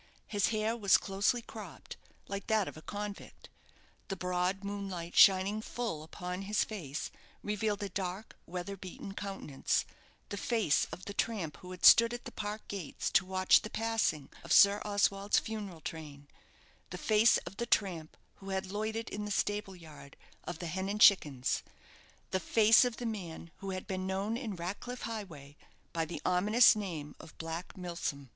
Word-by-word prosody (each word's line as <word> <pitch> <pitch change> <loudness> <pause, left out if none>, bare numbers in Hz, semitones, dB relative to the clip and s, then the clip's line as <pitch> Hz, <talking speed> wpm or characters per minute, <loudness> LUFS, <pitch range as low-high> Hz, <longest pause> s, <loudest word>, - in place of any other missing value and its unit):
His 205 -2 +1
hair 220 +1 0
was 200 -5 +5
closely 205 +5 0
cropped, - - -9 0.3
like 200 0 -5
that 220 -3 +2
of - - -7
a 155 - -10
convict. 205 +3 -7 0.6
The 195 - -3
broad 180 +2 -1
moonlight 195 -4 -5
shining 195 +2 +6
fall 225 -9 -4
upon 180 +3 -6
his 205 +2 +1
face, 165 -9 -5 0.3
revealed 210 0 -1
a 200 - -3
dark, 190 +2 -4
weather 180 +3 -5
beaten 195 +1 -8
countenance 195 -9 -2 0.4
the 200 - -4
face 215 -8 +2
of 175 +3 -8
the 200 - -5
tramp 195 -8 -2
who 180 - -12
had 185 -1 -3
stood 230 +1 +8
at 240 - -9
the - - -7
park 210 +1 -5
gates 195 -7 -4
to 185 0 +3
watch 185 0 +4
the 215 - -6
passing 225 -12 0
of - - -8
Sir 200 +1 +7
Oswald's 200 -1 +2
funeral 205 -7 -4
train 145 -3 -8 0.6
the - - -6
face 220 +1 +4
of 195 - -8
the 235 - -2
tramp 175 -9 0 0.2
who 195 - -10
had 190 -1 -2
loitered 220 +2 -2
in 210 0 -4
the - - -4
stable 205 -1 -1
yard 155 -5 -13 0.3
of 175 - -5
the 175 - -6
"Hen 190 +4 -3
and 210 +1 -2
Chickens" 145 -12 +5 0.7
the 190 - +1
face 220 +4 +6
of 245 -2 -1
the 245 - -5
man 175 -7 -5
who 195 - -6
had 185 -1 -4
been 185 -1 -3
known 195 +4 -1
in 230 -5 -4
Ratcliff 200 +8 -5
Highway 165 -11 -7 0.4
by 165 -1 0
the 170 - -7
ominous 210 +7 +6
name 165 -8 -5
of 160 - -13
Black 165 +3 -6
Milsom. 170 -7 -4
195 Hz, 170 wpm, -32 LUFS, 175-210 Hz, 0.7 s, stood